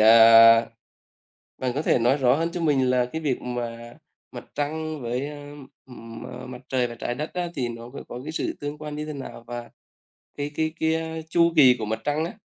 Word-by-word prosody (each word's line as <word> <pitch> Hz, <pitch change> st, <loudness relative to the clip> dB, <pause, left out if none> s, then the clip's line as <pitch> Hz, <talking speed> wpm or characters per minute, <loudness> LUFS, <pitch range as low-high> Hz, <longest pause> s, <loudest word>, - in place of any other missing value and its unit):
à, 115 Hz, +1 st, +8 dB, 0.9 s
bạn 130 Hz, -1 st, -1 dB
có 150 Hz, -, 0 dB
thể 125 Hz, -, +2 dB
nói 125 Hz, +5 st, +3 dB
rõ 130 Hz, -1 st, +4 dB
hơn 165 Hz, +2 st, -1 dB
cho 175 Hz, -, -4 dB
mình 135 Hz, -5 st, +2 dB
là 125 Hz, -1 st, +2 dB
cái 160 Hz, +6 st, -6 dB
việc 140 Hz, -5 st, -1 dB
mà 120 Hz, -1 st, -5 dB, 0.4 s
Mặt -, -, -9 dB
Trăng 155 Hz, +1 st, -3 dB
với, 125 Hz, +4 st, -2 dB
ừm, 145 Hz, -2 st, -10 dB, 0.2 s
M 115 Hz, 0 st, -9 dB
Mặt 125 Hz, 0 st, -9 dB
Trời 125 Hz, -2 st, +1 dB
và 120 Hz, -, -8 dB
Trái 120 Hz, +1 st, -4 dB
Đất 150 Hz, +3 st, -5 dB
á, 180 Hz, -1 st, -2 dB
thì 125 Hz, -3 st, -1 dB
nó 115 Hz, 0 st, -8 dB
c 125 Hz, -, -19 dB
có 125 Hz, -, -7 dB
cái 155 Hz, -, -4 dB
sự -, -, -2 dB
tương 145 Hz, +1 st, -4 dB
quan 150 Hz, -1 st, -7 dB
như 150 Hz, 0 st, -4 dB
thế 155 Hz, -, -5 dB
nào? 135 Hz, -4 st, -8 dB
Và 120 Hz, -1 st, -6 dB, 0.7 s
cái 145 Hz, 0 st, -2 dB
cái 155 Hz, 0 st, -1 dB
cái 160 Hz, 0 st, -1 dB
chu 170 Hz, 0 st, +3 dB
kỳ 130 Hz, -4 st, +7 dB
của 110 Hz, -, -3 dB
Mặt 110 Hz, +1 st, -3 dB
Trăng 150 Hz, +2 st, 0 dB
á, 175 Hz, -, -5 dB
135 Hz, 215 wpm, -25 LUFS, 120-155 Hz, 0.9 s, à